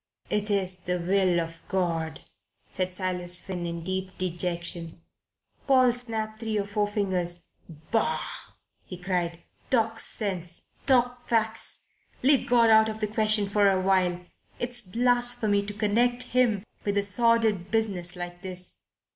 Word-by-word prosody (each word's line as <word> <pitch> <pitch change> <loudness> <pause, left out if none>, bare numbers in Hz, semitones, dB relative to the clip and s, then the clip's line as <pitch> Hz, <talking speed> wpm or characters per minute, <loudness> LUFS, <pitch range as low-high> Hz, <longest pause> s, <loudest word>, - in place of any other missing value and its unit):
"It 210 0 0
is 190 -2 0
the 180 0 0
will 180 0 +2
of 165 0 -5
God," 165 -4 -1 0.5
said 185 0 -2
Silas 180 -1 -2
Finn, 180 -2 -5
in 170 -1 -5
deep 190 +1 -4
dejection. 170 -2 -1 0.7
Paul 255 -3 +5
snapped 220 -3 -4
three 220 -2 -2
or 200 - 0
four 205 +1 0
fingers. 185 -4 -1 0.4
"Bah!" 225 -1 +1 0.6
he 180 - -9
cried. 175 -2 -2 0.3
"Talk 225 -2 +1
sense. 180 -5 -1 0.2
Talk 245 -2 +2
facts. 220 -1 +1 0.4
Leave 275 0 +4
God 235 -2 +5
out 220 0 +6
of 220 0 -5
the 215 - +1
question 215 -1 +2
for 200 0 +3
a 190 -1 +2
while. 185 -2 +2 0.4
It's 245 0 0
blasphemy 240 0 +1
to 205 - -5
connect 240 +4 +1
Him 235 -6 +3 0.2
with 205 0 -1
a 200 - +3
sordid 220 -2 +2
business 195 -5 0
like 175 0 -6
this. 185 -1 -6
200 Hz, 140 wpm, -27 LUFS, 180-225 Hz, 0.7 s, out